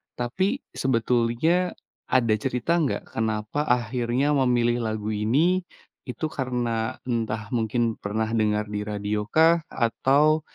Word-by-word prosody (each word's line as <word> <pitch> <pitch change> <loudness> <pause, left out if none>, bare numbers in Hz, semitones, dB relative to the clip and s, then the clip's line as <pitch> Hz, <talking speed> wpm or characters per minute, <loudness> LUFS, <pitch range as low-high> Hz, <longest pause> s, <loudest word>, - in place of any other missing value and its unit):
tapi 190 - -1
sebetulnya 125 +8 +1 0.4
ada 115 -4 +3
cerita 125 +9 -1
nggak, 145 -5 -2
kenapa 110 +5 -1
akhirnya 125 +3 +1
memilih 120 -2 +2
lagu 110 0 -3
ini, 155 - +2 0.4
itu 125 +5 -4
karena 125 -4 -2
entah 110 -3 -2
mungkin 115 0 0
pernah 110 +2 -2
dengar 105 -1 +1
di 105 0 -3
radio 105 0 -2
kah? 165 +1 +5
Atau 140 +6 +2
120 Hz, 115 wpm, -25 LUFS, 110-140 Hz, 0.4 s, kah